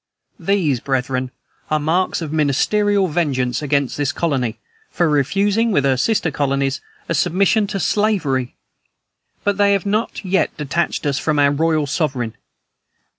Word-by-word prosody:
"These, 175 -10 +1
brethren, 130 0 -1 0.4
are 155 - +1
marks 165 +3 0
of 155 -1 -5
ministerial 195 +7 +2
vengeance 135 -7 -1
against 140 -2 0
this 145 -2 0
colony, 130 -9 -1 0.3
for 170 - +1
refusing, 200 - +1
with 145 -9 +2
her 135 -1 +3
sister 165 - +1
colonies, 140 -1 -1 0.3
a - - -1
submission 195 +5 +2
to 200 -1 -3
slavery; 160 - 0 0.9
but 205 -1 0
they 200 0 +4
have 200 -1 0
not 210 +1 -2
yet 190 +1 0
detached 150 +3 -2
us 140 -2 0
from 155 -2 0
our 140 -1 +4
royal 155 +1 +1
sovereign. 135 -6 -2
155 Hz, 140 wpm, -19 LUFS, 140-195 Hz, 0.9 s, they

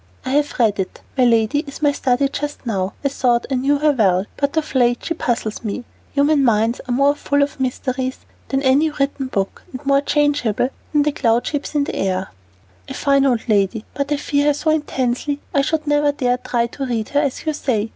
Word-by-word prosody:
"I 260 - -2
have 290 +1 +1
read 220 -5 +2
it. 185 - -4
My 255 -2 +4
lady 230 +3 +3
is 280 +2 -9
my 290 - +5
study 275 0 +1
just 290 0 -5
now. 195 -4 -1
I - - +4
thought 245 -3 +1
I - - +2
knew 270 +3 +2
her 300 +1 +3
well, 195 -8 +2
but 285 +2 -1
of 310 -3 -1
late 245 -2 +2
she 330 - -1
puzzles 235 -8 -2
me. 220 +3 -3 0.3
Human 285 0 +3
minds 230 0 +2
are - - -3
more 275 +3 +4
full 285 -1 +1
of 285 0 -4
mysteries 260 0 -2 0.3
than 270 0 -1
any 280 +4 +4
written 275 -2 -2
book 195 -6 -2
and 260 +2 -8
more 275 0 +4
changeable 285 -6 +1 0.2
than 295 -1 +3
the 300 - +1
cloud 235 -4 +1
shapes 290 0 -3
in 290 - +3
the - - -4
air." 190 0 -1 0.6
"A - - -6
fine 275 -1 +3
old 245 -3 0
lady, 210 0 +1
but 280 +1 -3
I 295 - +2
fear 285 0 0
her 295 - +4
so 310 +2 +1
intensely 285 -2 -1
I 280 - +4
should 310 +2 -1
never 290 0 +3
dare 250 -3 0
to - - -14
try 235 -1 +2
to 270 +3 -5
read 225 -3 -2
her, 285 - +2
as 285 0 -2
you 310 - 0
say." 230 -7 -1
270 Hz, 220 wpm, -20 LUFS, 235-290 Hz, 0.6 s, my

